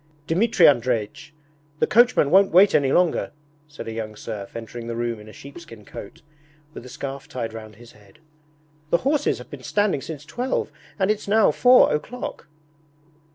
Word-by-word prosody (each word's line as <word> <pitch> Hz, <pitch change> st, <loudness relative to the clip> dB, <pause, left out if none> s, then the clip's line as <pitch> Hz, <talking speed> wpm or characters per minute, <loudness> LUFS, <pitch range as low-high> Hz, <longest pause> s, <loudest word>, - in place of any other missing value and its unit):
'Dmitri 180 Hz, +2 st, +3 dB
Andreich! 125 Hz, +1 st, +1 dB, 0.5 s
The -, -, +2 dB
coachman 235 Hz, -, +3 dB
won't 195 Hz, +2 st, +5 dB
wait 190 Hz, +4 st, +6 dB
any 135 Hz, -2 st, +2 dB
longer!' 175 Hz, -2 st, +1 dB, 0.3 s
said 150 Hz, -4 st, -10 dB
a -, -, -4 dB
young 110 Hz, -1 st, -6 dB
serf, 100 Hz, -1 st, -8 dB
entering 115 Hz, +1 st, -7 dB
the 115 Hz, -, -4 dB
room 120 Hz, -1 st, -3 dB
in 105 Hz, +1 st, -13 dB
a -, -, -11 dB
sheepskin 140 Hz, -5 st, -13 dB
coat, 100 Hz, -, -11 dB, 0.5 s
with -, -, -9 dB
a 125 Hz, -, -11 dB
scarf 135 Hz, +2 st, -7 dB
tied 115 Hz, -3 st, -5 dB
round 110 Hz, -1 st, -10 dB
his 120 Hz, +2 st, -15 dB
head. 105 Hz, -2 st, -21 dB, 0.7 s
'The 170 Hz, -, +3 dB
horses 285 Hz, -, 0 dB
have -, -, -13 dB
been -, -, -9 dB
standing 205 Hz, -9 st, 0 dB
since 150 Hz, -1 st, -8 dB
twelve, 250 Hz, -, -3 dB, 0.3 s
and 195 Hz, 0 st, +2 dB
it's 215 Hz, -1 st, -4 dB
now 215 Hz, +1 st, +4 dB
four 250 Hz, 0 st, +5 dB
o'clock!' 230 Hz, +10 st, -5 dB
140 Hz, 170 wpm, -23 LUFS, -, 0.7 s, wait